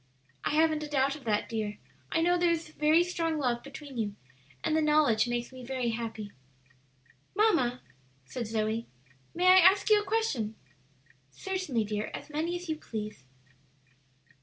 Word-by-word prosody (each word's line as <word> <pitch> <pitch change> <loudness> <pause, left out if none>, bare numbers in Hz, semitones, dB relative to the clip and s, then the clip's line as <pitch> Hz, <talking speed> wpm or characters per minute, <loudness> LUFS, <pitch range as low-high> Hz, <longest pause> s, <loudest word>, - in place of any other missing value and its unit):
"I - - 0
haven't 315 -1 +3
a 300 - -5
doubt 275 -1 +1
of 285 -5 -12
that, 210 -2 0
dear. 215 -2 -3 0.3
I 325 - +2
know 350 +1 +4
there 350 0 +3
is 330 -2 -1
very 310 +2 +3
strong 330 -3 -1
love 245 -4 0
between 280 -2 -9
you, 205 -2 -2 0.5
and 310 - +1
the 315 - +3
knowledge 300 -7 +3
makes 240 0 -2
me 255 -1 -10
very 255 -1 -2
happy." 225 -3 -5 1.0
"Mamma," 335 - +2 0.4
said 235 - -5
Zoe, 220 +1 -1 0.5
"may 355 +2 0
I 370 +1 +8
ask 385 +4 +5
you 420 -1 +6
a - - -6
question?" 375 - -1 0.7
"Certainly, 370 - -2
dear, 210 0 -3
as - - -9
many 320 +4 -1
as 355 0 -6
you 315 -1 -2
please." 210 - -6
285 Hz, 160 wpm, -30 LUFS, 230-335 Hz, 1.0 s, I